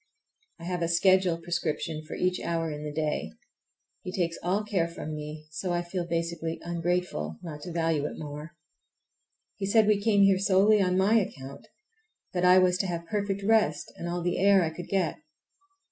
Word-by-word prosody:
I -, -, -11 dB
have 180 Hz, 0 st, -3 dB
a 170 Hz, -, +1 dB
schedule 185 Hz, 0 st, +3 dB
prescription 165 Hz, -2 st, -3 dB
for 155 Hz, -, -7 dB
each 180 Hz, 0 st, 0 dB
hour 165 Hz, -1 st, -2 dB
in 150 Hz, 0 st, -6 dB
the 150 Hz, -, -4 dB
day; 150 Hz, 0 st, -2 dB, 0.7 s
he 180 Hz, -, -6 dB
takes 170 Hz, -3 st, -1 dB
all 195 Hz, +4 st, 0 dB
care 195 Hz, -6 st, 0 dB
from 165 Hz, -2 st, -7 dB
me, 150 Hz, 0 st, -7 dB
and 155 Hz, -, -27 dB
so 180 Hz, +4 st, -3 dB
I 175 Hz, 0 st, 0 dB
feel 175 Hz, 0 st, -4 dB
basely 165 Hz, -1 st, -2 dB
ungrateful 170 Hz, -, -2 dB
not 150 Hz, -4 st, -7 dB
to 175 Hz, -, -7 dB
value 165 Hz, -3 st, 0 dB
it -, -, -8 dB
more. 150 Hz, +1 st, -8 dB, 1.0 s
He 195 Hz, -, -3 dB
said 220 Hz, +1 st, +5 dB
we 210 Hz, -1 st, +3 dB
came 200 Hz, -2 st, +4 dB
here 195 Hz, -1 st, +5 dB
solely 200 Hz, +2 st, +4 dB
on 180 Hz, -1 st, +2 dB
my 205 Hz, +4 st, +4 dB
account, 140 Hz, -8 st, -7 dB, 0.7 s
that 180 Hz, -1 st, -1 dB
I 180 Hz, +1 st, +7 dB
was 180 Hz, -1 st, +4 dB
to 195 Hz, -, 0 dB
have 170 Hz, -1 st, -4 dB
perfect 200 Hz, +1 st, -2 dB
rest 210 Hz, -8 st, +2 dB
and 170 Hz, -, -5 dB
all 175 Hz, 0 st, -2 dB
the 175 Hz, 0 st, 0 dB
air 195 Hz, -1 st, +5 dB
I 160 Hz, -, -1 dB
could 175 Hz, -, -7 dB
get. 190 Hz, -4 st, 0 dB
175 Hz, 190 wpm, -28 LUFS, 165-190 Hz, 1.0 s, I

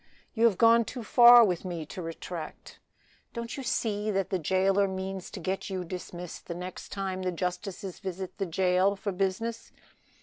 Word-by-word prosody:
You 230 Hz, 0 st, +3 dB
have 215 Hz, -6 st, +4 dB
gone 230 Hz, 0 st, +6 dB
too 240 Hz, +2 st, -7 dB
far 240 Hz, +1 st, +8 dB
with 180 Hz, -4 st, -1 dB
me 175 Hz, -4 st, -4 dB
to 180 Hz, -, -7 dB
retract; 165 Hz, 0 st, -7 dB, 0.5 s
don't 235 Hz, 0 st, -5 dB
you 275 Hz, -, -5 dB
see 215 Hz, -4 st, -1 dB
that 195 Hz, -2 st, -1 dB
the 190 Hz, -, +1 dB
jailer 190 Hz, +4 st, +2 dB
means 190 Hz, 0 st, -5 dB
to -, -, -8 dB
get 190 Hz, +4 st, -3 dB
you 185 Hz, -2 st, -3 dB
dismissed 180 Hz, -1 st, -7 dB
the 170 Hz, -, -4 dB
next 180 Hz, +1 st, -7 dB
time 190 Hz, -1 st, -3 dB
the 185 Hz, 0 st, -1 dB
justices 180 Hz, +2 st, -4 dB
visit 190 Hz, 0 st, -6 dB
the 195 Hz, -, -1 dB
jail 185 Hz, +3 st, +2 dB
for 200 Hz, +1 st, -3 dB
business? 195 Hz, +5 st, -2 dB
190 Hz, 175 wpm, -28 LUFS, 180-205 Hz, 0.5 s, far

